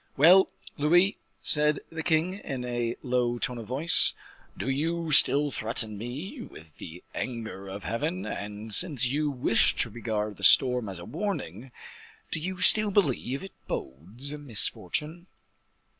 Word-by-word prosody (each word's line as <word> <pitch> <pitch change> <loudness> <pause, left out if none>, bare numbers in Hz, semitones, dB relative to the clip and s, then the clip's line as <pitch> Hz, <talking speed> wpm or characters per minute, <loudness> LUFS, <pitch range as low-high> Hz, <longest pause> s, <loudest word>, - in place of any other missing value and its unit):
"Well, 180 +7 +7 0.3
Louise," 175 +7 +4 0.3
said 150 -1 +2
the 160 0 -4
king, 160 +2 +1
in 130 -9 -5
a 120 -1 -2
low 125 -1 0
tone 120 0 -3
of 110 - -9
voice, 145 +7 +4 0.4
"do - - -4
you 160 +4 -1
still 145 +1 +5
threaten 110 -2 -2
me 140 - -6
with 80 - -13
the 85 +3 -9
anger 115 -5 -5
of 100 +1 -7
Heaven? 160 +11 -3
and, 105 +1 -5
since 145 - +3
you 145 +4 0
wished 125 -4 +2
to 115 - -2
regard 105 -2 -3
the - - -11
storm 125 -4 +5
as 95 - -5
a 85 - -9
warning, 135 - -5 0.6
do 165 - -1
you 185 +3 -5
still 215 +3 +6
believe 140 - 0
it 195 - -10
bodes 100 - -6
misfortune?" 150 - -4
130 Hz, 145 wpm, -27 LUFS, 115-160 Hz, 0.6 s, Well